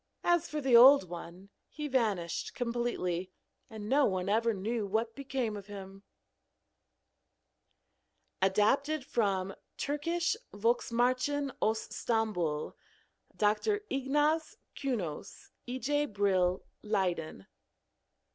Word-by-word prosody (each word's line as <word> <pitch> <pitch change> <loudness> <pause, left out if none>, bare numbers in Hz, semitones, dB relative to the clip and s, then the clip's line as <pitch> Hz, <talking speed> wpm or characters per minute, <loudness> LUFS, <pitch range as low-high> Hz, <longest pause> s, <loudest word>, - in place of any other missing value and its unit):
As 345 -2 +2
for 305 - -3
the 265 -3 +4
old 255 -3 +9
one, 175 +2 -9 0.2
he 300 -1 -5
vanished 205 - -1
completely, 235 -7 -2 0.4
and 215 -2 -7
no 280 +5 +4
one 185 -1 -1
ever 230 +2 +2
knew 215 +1 -2
what 225 +3 -1
became 265 -5 -2
of 200 -1 -8
him. 195 -1 -9 2.4
(Adapted 260 +10 +2
from 195 -5 0 0.2
Türkische 335 +7 -1 0.2
Volksmärchen 245 +5 +1
aus 220 +1 0
Stambul. 180 -10 -1 0.6
Dr. 215 - +2
Ignaz 295 +4 +1 0.2
Künos. 210 - -4 0.2
E. 250 +1 -3
J. 290 +4 0
Brill, 190 -4 +1 0.2
Leiden.) 180 - -2
225 Hz, 100 wpm, -31 LUFS, 195-270 Hz, 2.4 s, old